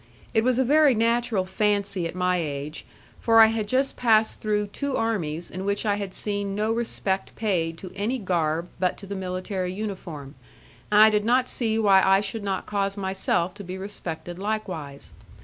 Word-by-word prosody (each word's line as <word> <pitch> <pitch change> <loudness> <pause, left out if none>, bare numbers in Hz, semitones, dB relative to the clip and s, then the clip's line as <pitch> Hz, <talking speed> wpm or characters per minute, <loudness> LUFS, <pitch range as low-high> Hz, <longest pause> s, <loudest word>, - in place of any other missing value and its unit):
It 220 - +3
was 250 0 +2
a 260 - +2
very 290 0 +5
natural 230 -3 +1
fancy 200 -2 0
at 165 - -8
my 180 0 +1
age, 150 -2 -5 0.3
for 225 -1 +4
I 225 - +10
had 215 -2 -2
just 265 +4 +1
passed 220 -3 +2
through 210 -1 0
two 280 -2 -2
armies 175 -8 -1
in 185 - -5
which 200 +2 -1
I 205 -1 +1
had 200 -2 -5
seen 200 -1 -2
no 215 +2 0
respect 215 -4 -2
paid 170 -7 -1
to 185 0 -9
any 215 +6 -1
garb 170 -5 -1
but 180 -1 0
to 200 - -9
the 200 - -6
military 185 0 -3
uniform, 180 -8 -6 0.6
and 210 0 +5
I 220 - +7
did 210 -1 +1
not 250 +3 +2
see 225 -3 0
why 200 -3 +5
I 195 0 +5
should 205 +2 -4
not 195 -2 -2
cause 200 -1 -1
myself 190 -2 0
to 205 +1 -9
be 185 0 -6
respected 175 -3 -6
likewise. 185 -9 -4
200 Hz, 185 wpm, -25 LUFS, 180-220 Hz, 0.6 s, I